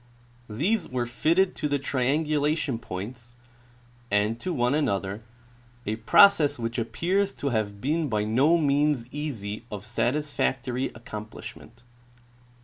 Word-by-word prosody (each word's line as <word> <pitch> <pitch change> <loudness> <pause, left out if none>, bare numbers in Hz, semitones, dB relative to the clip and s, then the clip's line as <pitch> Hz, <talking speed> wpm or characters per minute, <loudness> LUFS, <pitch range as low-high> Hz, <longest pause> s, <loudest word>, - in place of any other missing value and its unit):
These 175 - 0
were 125 -1 -1
fitted 165 +10 +2
to - - -1
the 145 -1 +1
triangulation 145 0 0
points 120 +5 -7 0.7
and 105 +3 +1
to 185 - -3
one 125 -4 +1
another, 100 -8 -1 0.6
a 110 +1 -2
process 150 - +5
which 115 +1 -3
appears 180 - 0
to 140 - -2
have 105 -4 -1
been 155 +3 0
by 105 -3 0
no 135 +10 +3
means 145 -4 +2
easy 115 -9 -4
of 105 -1 -6
satisfactory 130 +1 -1
accom 110 -2 -8
plishment. - - -11
130 Hz, 125 wpm, -26 LUFS, 110-150 Hz, 0.7 s, process